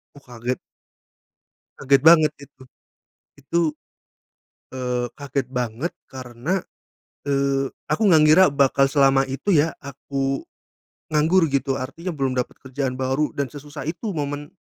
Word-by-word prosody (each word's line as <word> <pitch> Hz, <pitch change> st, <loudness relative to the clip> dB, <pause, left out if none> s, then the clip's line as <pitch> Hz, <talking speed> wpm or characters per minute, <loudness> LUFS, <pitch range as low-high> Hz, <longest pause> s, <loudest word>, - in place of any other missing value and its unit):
Oh, 145 Hz, -, -12 dB
kaget. 125 Hz, -1 st, -5 dB, 1.2 s
Kaget 135 Hz, 0 st, +3 dB
banget 155 Hz, -2 st, +7 dB
itu. 140 Hz, -2 st, -15 dB, 0.8 s
Itu, 165 Hz, +5 st, -1 dB, 1.2 s
eee, 125 Hz, -1 st, -2 dB
kaget 140 Hz, -2 st, -3 dB
banget 125 Hz, +5 st, -3 dB, 0.2 s
karena, 130 Hz, +8 st, -3 dB, 0.7 s
eee, 140 Hz, -1 st, +1 dB, 0.2 s
aku 155 Hz, -, 0 dB
gak 155 Hz, -2 st, +6 dB
ngira 160 Hz, +5 st, +7 dB
bakal 140 Hz, -1 st, +3 dB
selama 135 Hz, -1 st, +4 dB
itu, 135 Hz, +9 st, -4 dB
ya, 155 Hz, +2 st, +3 dB
aku, 135 Hz, 0 st, -3 dB, 0.6 s
nganggur, 160 Hz, +3 st, +3 dB
gitu. 135 Hz, -1 st, -1 dB
Artinya 165 Hz, +8 st, -5 dB
belum 135 Hz, -4 st, -2 dB
dapet 125 Hz, -, -3 dB
kerjaan 130 Hz, -1 st, -4 dB
baru 135 Hz, +3 st, 0 dB
dan 140 Hz, -2 st, -2 dB
sesusah 145 Hz, +1 st, -9 dB
itu 190 Hz, +6 st, -3 dB
momen, 145 Hz, -2 st, -4 dB
140 Hz, 125 wpm, -22 LUFS, 130-150 Hz, 1.2 s, banget